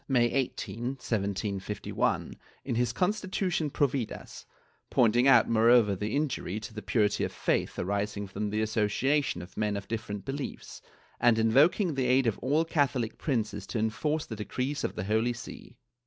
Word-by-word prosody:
May 125 -3 +3
18, 130 -1 -2
1751, 100 -2 -2 0.3
in - - -2
his 120 0 +1
constitution 185 - -1
Providas, 135 -4 -2 0.4
pointing 120 +2 +4
out 135 - +6
moreover 115 -2 +5
the 105 +5 -3
injury 135 -9 -1
to 115 0 -8
the 105 - -6
purity 105 -3 +1
of - - 0
the - - -16
faith - - 0
arising 100 +2 -2
from 100 +2 -4
the 110 +1 0
association 110 +3 0
of 90 - -13
men 105 -1 0
of 100 - -7
different 105 -3 -4
beliefs, 135 +1 -6 0.4
and 120 -2 +4
invoking 145 - +4
the 130 -2 0
aid 130 +1 +4
of 115 -4 0
all 150 +6 +1
Catholic 135 -8 0
princes 110 - -2
to - - -3
enforce 115 +8 -1
the 110 - -6
decrees 130 +7 -3
of - - -2
the - - -3
Holy 110 +4 +1
See. 120 +1 -10
115 Hz, 160 wpm, -29 LUFS, 105-135 Hz, 0.4 s, out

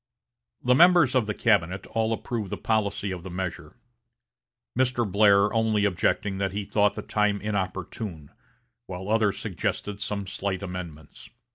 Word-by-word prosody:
The 125 - +4
members 170 -2 +6
of 125 -5 +2
the 105 - -2
cabinet 95 -4 +1
all 110 0 -1
approved 115 -2 -3
the - - -4
policy 100 -2 -1
of 90 -2 -5
the 95 - -8
measure; 90 -1 -5 1.0
Mr. 125 -1 +1
Blair 100 +1 +4
only 110 -2 +2
objecting 95 +1 0
that 95 -1 -1
he 100 0 -3
thought 105 0 +2
the - - -5
time 105 -1 +1
inopportune, 95 -5 -4 0.6
while 95 +1 -6
others 110 -2 +2
suggested 105 +1 -3
some 100 -1 -3
slight 95 0 -3
amendments. 85 -5 -8
100 Hz, 145 wpm, -26 LUFS, 95-110 Hz, 1.0 s, members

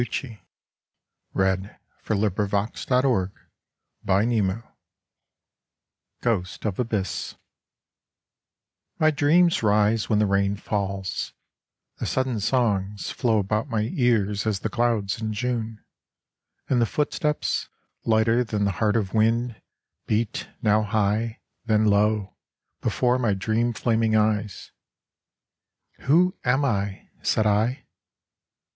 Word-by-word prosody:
Such 120 - -3
a 115 -6 -11 0.9
coward, 95 +1 0 0.3
you 110 - +2
my 105 +1 +2 0.2
beloved! 110 0 +1 0.7
93 100 0 +2 1.7
GHOST 100 -6 -1
OF 100 -4 -2
ABYSS 105 -7 -2 1.6
My 155 0 +4
dreams 165 +4 +3
rise 105 +1 +2
when 110 - +3
the 105 - +3
rain 100 0 +1
falls: 100 -2 -3 0.7
the - - -2
sudden 130 -4 0
songs 105 -3 0
Flow 115 -3 +1
about 105 +6 -1
my 110 -3 0
ears 110 - +1
as 105 -3 -1
the 110 - -2
clouds 110 -3 0
in 110 -1 -2
June; 115 -1 -3 0.8
And 125 -2 +2
the 115 - +3
footsteps, 150 +2 -1 0.3
lighter 115 +2 +3
than 105 -3 -1
the 100 - +1
heart 105 0 +2
of 100 -5 -1
wind, 115 +1 +1 0.5
Beat, 110 0 -1
now 105 0 +4
high, 110 +2 0 0.2
then 110 -1 +3
low, 105 -1 +2 0.5
before 125 0 +1
my 110 -5 +1
dream 110 +4 0
flaming 110 -1 +1
eyes. 105 -2 0 0.7
" - - -44
Who 175 +7 +4
am 130 +3 +2
I? 100 -5 -2
" - - -33
said 110 - +1
I. 110 +6 +1
110 Hz, 115 wpm, -25 LUFS, 100-120 Hz, 1.7 s, My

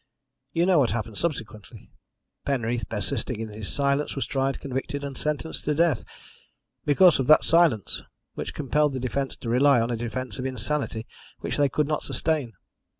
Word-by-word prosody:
You 170 +1 +2
know 180 -3 +5
what 130 -5 +3
happened 110 -2 -3
subsequently. 115 - -5 0.5
Penreath, 120 -3 -1
persisting 115 +2 -3
in 115 -1 -4
his 105 -1 -5
silence, 140 +1 0
was 135 - -1
tried, 135 0 -1
convicted, 140 +1 -4
and 140 -1 -5
sentenced 150 +2 -3
to 150 - +1
death 165 -5 +2 0.8
because 170 +3 +6
of 130 - 0
that 155 - +7
silence, 165 - +3 0.3
which - - -5
compelled 150 0 +1
the 130 - -2
defence 130 +2 -2
to - - -9
rely 130 +2 +5
on 115 +1 0
a - - 0
defence 120 0 -4
of 130 - -3
insanity 130 -2 -3 0.4
which - - -3
they 145 -1 +3
could 150 +3 +1
not 150 0 0
sustain. 150 -8 -1
135 Hz, 170 wpm, -26 LUFS, 120-150 Hz, 0.8 s, that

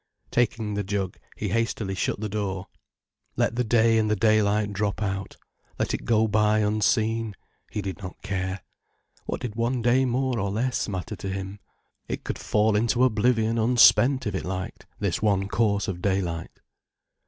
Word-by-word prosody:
Taking 115 -3 0
the 100 0 -1
jug, 95 -2 -3 0.2
he 105 - -2
hastily 115 -2 -1
shut 95 - -1
the 110 - -2
door. 100 -3 -3 0.7
Let - - +1
the 125 - +1
day 115 0 +4
and 110 -1 +1
the 105 - +2
daylight 105 -1 +2
drop 100 0 -1
out, 95 -2 -3 0.4
let - - -1
it - - -3
go 110 -2 +3
by 105 0 +3
unseen. 110 +1 +1 0.3
He 105 - -4
did 95 +1 -5
not 95 -2 -8
care. 95 -1 -3 0.7
What - - -3
did 120 -4 -4
one 120 +2 -1
day 125 +3 +4
more 130 -1 0
or 100 0 -1
less 120 +4 -1
matter 95 -3 -4
to 95 - -5
him. 95 +1 -5 0.5
It - - -4
could - - -4
fall 105 0 +2
into 120 +3 +2
oblivion 115 -1 +2
unspent 125 +3 +5
if 105 - -2
it 95 - -2
liked, 95 0 -5
this 100 -4 -1
one 100 -2 +2
course 100 0 +1
of 90 -2 -4
daylight. 95 -4 -2
105 Hz, 170 wpm, -25 LUFS, 100-115 Hz, 0.7 s, unspent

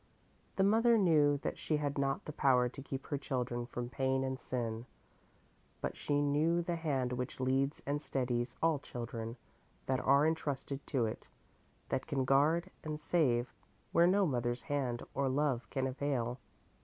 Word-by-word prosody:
The 190 - +3
mother 225 +3 +5
knew 150 -7 +4
that - - -3
she 155 - 0
had 145 -1 -1
not 135 0 0
the 150 - -6
power 130 -4 +4
to 130 +3 -8
keep 135 0 -5
her 145 - -2
children 125 -3 -2
from 120 -1 -4
pain 130 +1 0
and 130 -1 -2
sin, 115 -1 -3 0.9
but - - -3
she 145 0 0
knew 155 +4 +2
the 170 0 -1
hand 135 -7 -1
which 125 +1 -4
leads 135 +2 +1
and 145 +1 -1
steadies 125 -3 -1
all 160 -3 +3
children 115 -2 -6 0.5
that 130 -1 +1
are 140 +2 +4
entrusted 145 -3 -2
to 130 -5 +1
it, 110 - -5 0.6
that 130 0 -1
can 135 -2 0
guard 155 +7 +3
and 155 -1 -4
save 130 -7 +1 0.4
where 170 +1 +5
no 195 +2 +4
mother's 120 -4 -1
hand 130 -5 -1
or 140 -1 +1
love 130 -5 0
can 135 -1 -1
avail. 130 -2 -1
135 Hz, 165 wpm, -34 LUFS, 125-150 Hz, 0.9 s, mother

